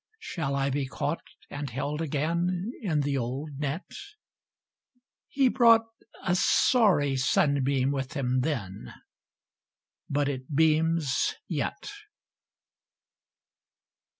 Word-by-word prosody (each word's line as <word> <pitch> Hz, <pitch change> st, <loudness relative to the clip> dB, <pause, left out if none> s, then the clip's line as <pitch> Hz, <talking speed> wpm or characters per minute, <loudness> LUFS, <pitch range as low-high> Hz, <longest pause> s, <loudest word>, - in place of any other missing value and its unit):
Shall 160 Hz, -, -3 dB
I 140 Hz, 0 st, 0 dB
be 140 Hz, 0 st, -1 dB
caught 145 Hz, +4 st, -3 dB, 0.3 s
and 145 Hz, -1 st, -4 dB
held 145 Hz, +5 st, -3 dB
again 170 Hz, +6 st, -1 dB
In 160 Hz, -9 st, 0 dB
the 140 Hz, -1 st, 0 dB
old 135 Hz, +4 st, -5 dB
net? 150 Hz, +5 st, -3 dB, 0.8 s
— 250 Hz, 0 st, -49 dB
He 270 Hz, -2 st, +5 dB
brought 230 Hz, -2 st, +5 dB, 0.4 s
a 175 Hz, -, +1 dB
sorry 180 Hz, -, +3 dB
sunbeam 135 Hz, 0 st, +2 dB
with 135 Hz, -2 st, -3 dB
him 130 Hz, -3 st, 0 dB
then, 120 Hz, -10 st, -4 dB, 1.1 s
But 145 Hz, 0 st, +1 dB
it 135 Hz, +1 st, -4 dB
beams 160 Hz, -2 st, +2 dB
yet. -, -, -3 dB
145 Hz, 100 wpm, -27 LUFS, 135-170 Hz, 1.1 s, He